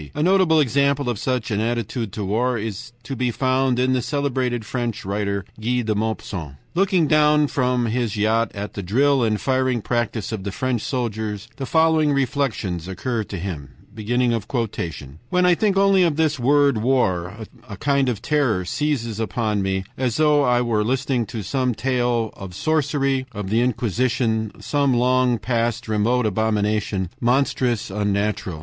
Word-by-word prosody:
A 150 Hz, -, 0 dB
notable 180 Hz, -3 st, +4 dB
example 140 Hz, -1 st, +2 dB
of 110 Hz, -, -5 dB
such 125 Hz, -2 st, -1 dB
an 105 Hz, -, 0 dB
attitude 115 Hz, -1 st, -2 dB
to 105 Hz, -3 st, -3 dB
war 120 Hz, +5 st, 0 dB
is 110 Hz, +2 st, -5 dB
to 135 Hz, +4 st, -5 dB
be 125 Hz, 0 st, 0 dB
found 130 Hz, +1 st, +1 dB
in 130 Hz, +1 st, +2 dB
the 130 Hz, -, +1 dB
celebrated 130 Hz, -4 st, -1 dB
French 120 Hz, -4 st, -3 dB
writer 100 Hz, -1 st, -2 dB
Guy 120 Hz, +2 st, 0 dB
de 110 Hz, -1 st, 0 dB
Maupassant. 100 Hz, -8 st, -3 dB, 0.2 s
Looking 185 Hz, -2 st, +2 dB, 0.4 s
from 125 Hz, -3 st, 0 dB
his 115 Hz, -2 st, -1 dB
yacht 110 Hz, +1 st, +2 dB
at 100 Hz, -1 st, -5 dB
the 100 Hz, -, -4 dB
drill 130 Hz, +8 st, +2 dB
and 110 Hz, -2 st, +1 dB
firing 130 Hz, +2 st, +1 dB
practice 115 Hz, -3 st, -2 dB
of 110 Hz, -4 st, -4 dB
the 100 Hz, -, -3 dB
French 125 Hz, +2 st, -1 dB
soldiers 110 Hz, -5 st, -3 dB
the 135 Hz, -, -4 dB
following 160 Hz, -1 st, +3 dB
reflections 120 Hz, -, -1 dB
occur 110 Hz, +5 st, -2 dB
to 100 Hz, -, -6 dB
him: 80 Hz, -7 st, -6 dB, 1.6 s
"When 180 Hz, 0 st, +2 dB
I 180 Hz, -, +6 dB
think 195 Hz, +2 st, +1 dB
only 195 Hz, -1 st, +4 dB
of 170 Hz, -4 st, +3 dB
this 155 Hz, -2 st, +1 dB
word 140 Hz, -1 st, +3 dB
war, 100 Hz, -7 st, +1 dB, 0.3 s
a 100 Hz, -, -7 dB
kind 140 Hz, 0 st, +1 dB
of 110 Hz, -3 st, -4 dB
terror 125 Hz, -11 st, +1 dB
seizes 115 Hz, -3 st, -2 dB
upon 110 Hz, -2 st, -1 dB
me, 95 Hz, 0 st, -1 dB, 0.2 s
as 125 Hz, -4 st, 0 dB
though 150 Hz, -1 st, +4 dB
I 125 Hz, -3 st, +3 dB
were 110 Hz, -3 st, +1 dB
listening 125 Hz, 0 st, 0 dB
to 110 Hz, 0 st, -5 dB
some 125 Hz, +3 st, -1 dB
tale 120 Hz, -2 st, 0 dB
of 95 Hz, -3 st, -9 dB
sorcery, 140 Hz, -, 0 dB
of 105 Hz, -2 st, -5 dB
the 115 Hz, +2 st, +3 dB
Inquisition, 115 Hz, -2 st, 0 dB
some 140 Hz, -3 st, +1 dB
long 125 Hz, 0 st, +3 dB
past, 115 Hz, 0 st, -1 dB
remote 110 Hz, +3 st, +1 dB
abomination, 105 Hz, -3 st, 0 dB
monstrous, 125 Hz, -3 st, +1 dB
unnatural. 100 Hz, -4 st, -1 dB
120 Hz, 160 wpm, -22 LUFS, 105-135 Hz, 1.6 s, I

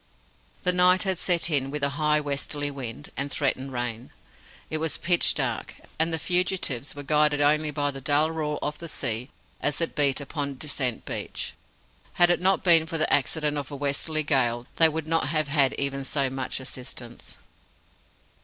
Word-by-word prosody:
The 180 Hz, -1 st, +2 dB
night 180 Hz, +1 st, +5 dB
had 190 Hz, -3 st, -1 dB
set 175 Hz, -2 st, +2 dB
in 135 Hz, -2 st, +1 dB
with 145 Hz, 0 st, -4 dB
a 140 Hz, -, +4 dB
high 150 Hz, +1 st, +2 dB
westerly 145 Hz, 0 st, -2 dB
wind, 135 Hz, 0 st, -7 dB
and 140 Hz, +1 st, -2 dB
threatened 135 Hz, -1 st, -1 dB
rain. 120 Hz, -1 st, -4 dB, 0.6 s
It 155 Hz, -, -3 dB
was 160 Hz, 0 st, +1 dB
pitch 175 Hz, 0 st, +3 dB
dark; -, -, -2 dB, 0.2 s
and 160 Hz, +1 st, +2 dB
the 160 Hz, -, 0 dB
fugitives 175 Hz, -7 st, 0 dB
were 145 Hz, -, -7 dB
guided 150 Hz, 0 st, +3 dB
only 150 Hz, +1 st, +3 dB
by 145 Hz, -1 st, 0 dB
the 135 Hz, -1 st, -8 dB
dull 150 Hz, +4 st, +2 dB
roar 150 Hz, -2 st, -2 dB
of 150 Hz, -, -3 dB
the 170 Hz, -1 st, -7 dB
sea 120 Hz, -2 st, -1 dB, 0.3 s
as 145 Hz, -, 0 dB
it 165 Hz, -, -1 dB
beat 140 Hz, -2 st, +2 dB
upon 140 Hz, -1 st, -4 dB
Descent 130 Hz, -5 st, -2 dB
Beach. -, -, -4 dB, 0.6 s
Had 175 Hz, 0 st, +5 dB
it 175 Hz, -, +1 dB
not 190 Hz, 0 st, +3 dB
been 165 Hz, -3 st, +5 dB
for 165 Hz, -1 st, -3 dB
the 155 Hz, -, +1 dB
accident 150 Hz, +3 st, +1 dB
of 140 Hz, -, -6 dB
a 145 Hz, -, -6 dB
westerly 145 Hz, +3 st, -1 dB
gale, 125 Hz, -5 st, +1 dB
they 165 Hz, -1 st, +6 dB
would 160 Hz, 0 st, -4 dB
not 165 Hz, -1 st, +1 dB
have 155 Hz, -1 st, 0 dB
had 140 Hz, -3 st, +3 dB
even 140 Hz, 0 st, -2 dB
so 135 Hz, -1 st, 0 dB
much 130 Hz, 0 st, -3 dB
assistance. 125 Hz, -2 st, -7 dB
145 Hz, 180 wpm, -26 LUFS, 135-160 Hz, 0.6 s, they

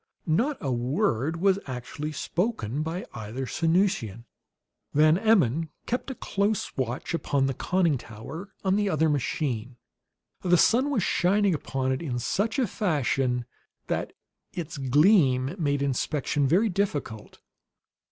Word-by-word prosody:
Not 235 Hz, -, +1 dB
a 135 Hz, -, -1 dB
word 135 Hz, -, 0 dB
was 195 Hz, +1 st, +3 dB
actually 135 Hz, +4 st, -5 dB
spoken 150 Hz, -, -2 dB
by 165 Hz, +4 st, -3 dB
either 110 Hz, +4 st, -5 dB
Sanusian. 165 Hz, -, 0 dB, 0.7 s
Van 155 Hz, +2 st, +6 dB
Emmon 165 Hz, -, +2 dB, 0.2 s
kept 245 Hz, +3 st, -2 dB
a 265 Hz, -, -4 dB
close 200 Hz, -1 st, -1 dB
watch 125 Hz, +4 st, -3 dB
upon 140 Hz, -4 st, +1 dB
the 135 Hz, -, 0 dB
conning 170 Hz, -1 st, +1 dB
tower 135 Hz, -, -9 dB
on 190 Hz, 0 st, +2 dB
the 205 Hz, -1 st, +1 dB
other 160 Hz, -2 st, +2 dB
machine. 130 Hz, -4 st, -2 dB, 0.6 s
The 180 Hz, -1 st, +4 dB
sun 255 Hz, +10 st, +4 dB
was 245 Hz, -10 st, +1 dB
shining 195 Hz, +2 st, +2 dB
upon 135 Hz, -3 st, -2 dB
it 130 Hz, -, -1 dB
in 135 Hz, -7 st, -3 dB
such 205 Hz, -, -1 dB
a 260 Hz, -, +3 dB
fashion 135 Hz, -, 0 dB, 0.4 s
that -, -, -2 dB, 0.4 s
its 160 Hz, -4 st, -5 dB
gleam 140 Hz, -, +4 dB
made 145 Hz, -3 st, +1 dB
inspection 140 Hz, +1 st, 0 dB
very 185 Hz, -, +3 dB
difficult. 150 Hz, -, -3 dB
155 Hz, 135 wpm, -27 LUFS, 130-190 Hz, 0.7 s, Van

